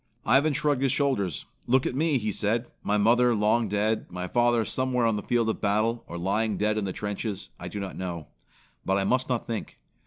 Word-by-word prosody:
Ivan 135 +7 +4
shrugged 145 -1 +1
his 135 -2 +2
shoulders. 130 - 0 0.2
"Look 130 +2 +3
at - - -1
me," 150 +1 +2
he 110 -3 -2
said. 115 +4 0 0.2
"My 105 - +1
mother 120 +3 +4
long 110 +2 +2
dead, 105 +2 0
my 90 0 -5
father 120 +2 +2
somewhere 125 +1 0
on 115 -1 +2
the 105 - -2
field 120 0 +1
of 110 - -2
battle, 110 +3 +1
or 85 - -6
lying 100 +4 0
dead 105 +1 +1
in 100 - -2
the 95 - -2
trenches. 105 0 -4
I - - -6
do 105 - -5
not 100 -2 -5
know; 85 -5 -5 0.5
but 95 +1 +1
I 100 - +1
must 130 +6 +1
not 125 -2 -1
think. 115 -2 -5
110 Hz, 215 wpm, -27 LUFS, 100-125 Hz, 0.5 s, Ivan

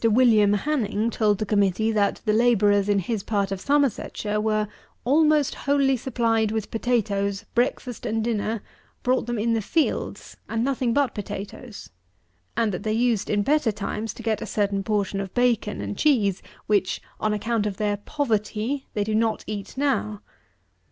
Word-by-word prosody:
WILLIAM 220 -3 +5
HANNING 225 -2 0
told 210 -3 +2
the 215 - -2
Committee 205 +1 +2
that 205 -2 +1
the 215 - +2
labourers 210 -3 +3
in 205 - +3
his 200 +3 -1
part 200 -1 -1
of 195 -1 -3
Somersetshire 250 -6 0
were 215 -1 +1 0.4
"almost 300 +2 +3
wholly 280 -1 +2
supplied 230 -3 0
with 220 -2 -3
potatoes, 205 -4 0
breakfast 245 0 -1
and 225 0 0
dinner, 220 -1 -1 0.4
brought 250 -2 +1
them 240 -1 -2
in 230 +2 +1
the 225 - +1
fields, 315 +9 -1
and 225 0 0
nothing 255 -2 0
but 275 0 +1
potatoes; 205 +2 -7 0.7
and 230 -2 +2
that 180 - -4
they 215 - -2
used, 230 -2 +1
in 205 -1 +2
better 290 -2 +2
times, 210 +1 -4
to 235 - -9
get 220 -1 0
a - - -4
certain 200 -1 0
portion 200 -1 -1
of 195 -2 -7
bacon 245 - +1
and 100 0 -5
cheese, 210 -11 +2 0.2
which, 200 -3 +1 0.2
on 215 - 0
account 210 +1 0
of 195 -2 -4
their 205 -1 0
"poverty, 230 +1 -2
they 205 - +1
do 215 +1 -2
not 220 0 +1
eat 205 +2 -6
now." 260 -7 0
220 Hz, 165 wpm, -24 LUFS, 205-240 Hz, 0.7 s, WILLIAM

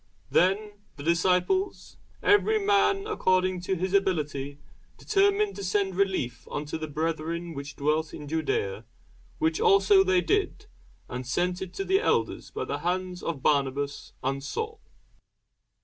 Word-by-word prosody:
Then 205 +3 +2 0.2
the 140 - -9
disciples, 180 - +1 0.3
every 415 +1 +4
man 400 -1 +2
according 185 - +1
to 190 - 0
his 185 +2 -2
ability, 150 -8 0 0.4
determined 405 0 +2
to 200 - -5
send 190 0 0
relief 190 -11 -1
unto 150 +2 -4
the 155 - -4
brethren 165 +2 -3
which 140 -1 -7
dwelt 155 +2 0
in 150 - -8
Judæa: 150 -10 -1 0.5
which 160 0 +1
also 195 0 +6
they 185 -1 +3
did, 410 - 0 0.4
and 125 0 -6
sent 180 +7 0
it 190 -2 -5
to 390 - -3
the 385 +1 +3
elders - - 0
by - - -4
the 145 - -3
hands 180 +2 -2
of 155 -6 -4
Barnabas 140 -1 0
and 135 +1 -1
Saul. 445 - -4
180 Hz, 140 wpm, -27 LUFS, 150-200 Hz, 0.5 s, also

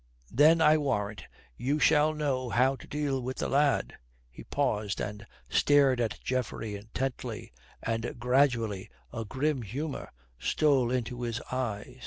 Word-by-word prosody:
Then 155 +5 +5
I 155 0 +6
warrant 105 - -2 0.3
you 135 +4 0
we - - -2
shall 150 +1 +4
know 135 -4 -1
how 130 +3 +3
to - - -13
deal 145 -3 -1
with 130 +1 -4
the - - -1
lad." 140 0 +1 0.3
He - - -11
paused 105 -8 -1
and 105 +1 -5 0.2
stared 140 -4 +4
at 115 -2 -2
Geoffrey 120 -4 -2
intently, 110 - -5 0.3
and 115 +1 -2
gradually 120 -5 +1 0.2
a 115 - -3
grim 135 +4 -1
humour 135 +8 -5 0.3
stole 140 -5 +2
into 125 -1 -2
his 120 -1 -2
eyes. 125 -1 -3
130 Hz, 145 wpm, -29 LUFS, 115-140 Hz, 0.3 s, I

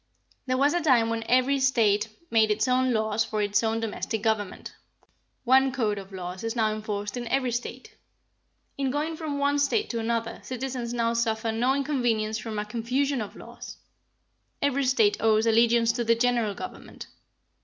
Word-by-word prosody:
There 255 0 +1
was 285 +2 +3
a 350 - +1
time 245 -7 +3
when 230 0 -2
every 255 +2 +3
State 220 -5 +2 0.2
made 220 -1 +4
its 215 +2 +1
own 255 0 +2
laws 220 -1 +1
for 215 - -4
its 205 0 +2
own 225 0 0
domestic 220 -1 -3
government. 210 -4 -2 0.7
One 265 +1 +4
code 220 -6 -1
of 195 0 -11
laws 185 0 -6
is 225 +1 -3
now 220 -2 +1
enforced 210 0 -4
in 240 -1 -4
every 255 0 0
State. 250 - -5 0.9
In 270 -1 0
going 300 +4 -2
from 310 -3 -4
one 285 0 +1
State 415 +10 +1
to 235 - -2
another 230 0 -2
citizens 255 -2 -4
now 230 -1 0
suffer 225 -1 0
no 245 +4 +1
inconvenience 240 -6 0
from 220 -1 -6
a 210 - -2
confusion 250 +5 -1
of 210 - -7
laws. - - -10 0.8
Every 280 -1 +1
State 225 -5 +3
owes 220 0 +3
allegiance 230 0 +4
to 240 +1 -2
the 230 0 +3
General 235 -3 +1
Government. - - -9
230 Hz, 175 wpm, -26 LUFS, 220-260 Hz, 0.9 s, made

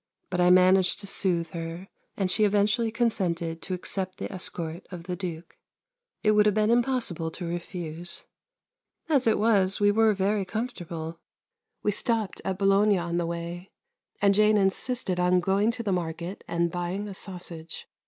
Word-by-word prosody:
But 180 -1 +1
I 180 - +5
managed 185 +1 +5
to - - -7
soothe 175 -4 0
her, 165 +2 -6 0.3
and 190 -2 0
she 215 - +2
eventually 210 +3 +2
consented 175 -8 -1
to 185 - -3
accept 185 +1 -3
the - - -5
escort 170 -2 -5
of 175 -3 -8
the 180 +1 -4
Duke. 175 -2 -7 0.6
It 215 - +4
would 210 0 +5
have 210 - +2
been 215 +1 +3
impossible 235 -9 +1
to 175 +2 -7
refuse. 170 -1 -6 0.9
As 275 -6 +3
it 225 - +4
was, 200 -3 +2
we 205 0 +4
were 220 0 +4
very 195 +1 +1
comfortable. 170 -6 -5 0.6
We 210 - +2
stopped 220 0 0
at 190 - -2
Bologna 200 +1 +4
on 170 -1 -2
the 170 -1 0
way, 170 +2 -5 0.5
and 200 -1 +4
Jane 215 +1 +4
insisted 195 0 0
on 180 0 +4
going 195 +4 +2
to 235 0 -2
the 205 - -1
market 175 +1 -3
and 170 0 0
buying 180 +4 -3
a 200 - -6
sausage. 175 -4 -7
190 Hz, 165 wpm, -27 LUFS, 175-210 Hz, 0.9 s, I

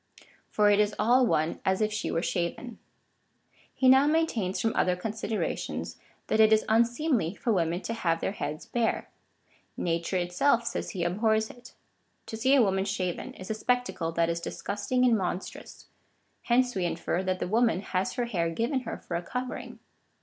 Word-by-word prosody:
For 210 -1 +3
it 205 - +4
is 210 0 +2
all 245 +2 +4
one 160 -3 0
as 190 0 +1
if 215 -1 0
she 215 - -2
were 165 - -1
shaven. 185 +7 -3 1.0
He 260 - +2
now 265 +2 +7
maintains 295 - 0
from 225 - 0
other 180 0 +2
considerations, 215 +3 -3 0.3
that 220 - 0
it 220 0 +6
is 220 0 +4
unseemly 235 - +1
for 230 - 0
women 170 -1 0
to 230 - -4
have 165 -7 0
their - - -1
heads 150 -6 -5
bare. 235 -2 -1 0.7
Nature 170 +2 -1
itself, 180 +8 +2
says - - -3
he, 180 -4 -3
abhors 220 +5 +1
it. 245 0 -15 0.5
To 225 - -6
see 260 +5 +3
a 265 - +6
woman 190 -1 +1
shaven 185 -3 -3
is 185 +3 -7
a - - +1
spectacle 220 -7 -1
that 165 0 +2
is 170 0 -2
disgusting 205 +8 -1
and 240 -2 +5
monstrous. 185 -2 -5 0.6
Hence 245 +1 +3
we 185 -2 -1
infer 175 +1 -1
that 185 -1 -1
the - - -3
woman 225 -1 +2
has 190 -1 -2
her 245 -2 -1
hair 175 -8 -1
given 235 - -1
her 235 -3 -6
for 175 - -6
a 170 - -1
covering. 250 +8 -5
215 Hz, 180 wpm, -28 LUFS, 180-240 Hz, 1.0 s, now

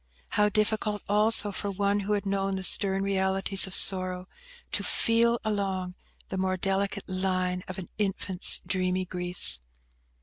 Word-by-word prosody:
How 210 0 +2
difficult 215 -1 0
also 210 0 +3
for 200 +1 -4
one 200 +1 0
who 205 +1 -1
had 205 0 -1
known 195 0 -1
the 190 - -4
stern 195 +1 +3
realities 195 0 +2
of 190 - -5
sorrow, 185 -1 +3 0.4
to - - -1
"feel 235 +1 +2
along" 195 -4 -2 0.4
the 190 - -4
more 185 0 0
delicate 195 +2 -2
"line" 185 -1 -1
of 185 - -7
an 190 - -6
infant's 195 -2 -1
dreamy 185 0 0
griefs! 180 - 0
195 Hz, 145 wpm, -27 LUFS, 185-205 Hz, 0.4 s, also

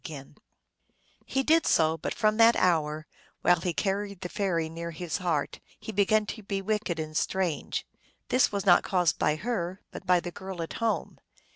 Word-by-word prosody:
331 145 -2 -15
He 270 - 0
did 320 +2 +3
so, 160 0 +3
but 160 - -4
from 215 -1 +2
that 230 +1 +7
hour, 155 -4 +1 0.4
while 175 -2 +4
he 180 - 0
carried 200 +2 -2
the 180 - -4
fairy 175 -5 -1
near 165 +1 -6
his 170 0 -4
heart, 170 -7 -1 0.2
he - - -6
began 210 +1 +2
to 220 - -6
be 200 -1 -3
wicked 200 -3 -1
and 155 -1 -5
strange. 180 -2 -1 0.4
This 255 - +3
was 200 -1 -2
not 180 - +6
caused 180 -3 +1
by 150 - +2
her, 185 -1 -3
but 185 - -9
by 180 -1 +5
the 175 0 -6
girl 190 -2 -6
at 165 - -7
home. 230 -1 -1
180 Hz, 180 wpm, -28 LUFS, 165-205 Hz, 0.4 s, that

